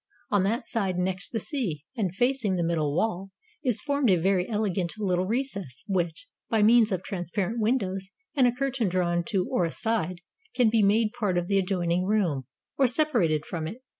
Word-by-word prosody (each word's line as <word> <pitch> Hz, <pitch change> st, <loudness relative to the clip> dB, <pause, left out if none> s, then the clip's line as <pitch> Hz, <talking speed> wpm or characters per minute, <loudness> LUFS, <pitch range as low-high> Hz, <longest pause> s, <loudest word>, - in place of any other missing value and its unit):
On 205 Hz, -, +4 dB
that 225 Hz, +7 st, 0 dB
side 195 Hz, -6 st, -1 dB
next 185 Hz, +1 st, -1 dB
the 225 Hz, -, -2 dB
sea, 200 Hz, -, -3 dB
and 190 Hz, -7 st, -1 dB
facing 245 Hz, -4 st, +1 dB
the 175 Hz, -, 0 dB
middle 155 Hz, -4 st, 0 dB
wall, 195 Hz, -1 st, -1 dB, 0.3 s
is 250 Hz, -6 st, +1 dB
formed 285 Hz, -4 st, +1 dB
a 185 Hz, -, +6 dB
very 180 Hz, +2 st, +1 dB
elegant 195 Hz, -5 st, -1 dB
little 185 Hz, -3 st, 0 dB
recess, 200 Hz, -, -3 dB
which, 185 Hz, -, -2 dB, 0.2 s
by 220 Hz, -2 st, +3 dB
means 225 Hz, 0 st, +5 dB
of 185 Hz, -1 st, -1 dB
transparent 195 Hz, +4 st, -3 dB
windows 195 Hz, -5 st, 0 dB, 0.2 s
and 265 Hz, -4 st, +4 dB
a -, -, +3 dB
curtain 255 Hz, -4 st, -1 dB
drawn 175 Hz, -1 st, +1 dB
to 195 Hz, -5 st, 0 dB
or 180 Hz, -, +2 dB
aside, 180 Hz, 0 st, -1 dB, 0.3 s
can 240 Hz, -4 st, +4 dB
be 225 Hz, -1 st, +3 dB
made 215 Hz, +2 st, +3 dB
part 205 Hz, -7 st, 0 dB
of 175 Hz, -, 0 dB
the 195 Hz, +1 st, +2 dB
adjoining 180 Hz, -2 st, 0 dB
room, 175 Hz, -, 0 dB, 0.3 s
or 270 Hz, -, +6 dB
separated 235 Hz, -, +2 dB
from 160 Hz, -2 st, -4 dB
it. 230 Hz, +9 st, -8 dB
195 Hz, 185 wpm, -27 LUFS, 180-230 Hz, 0.3 s, a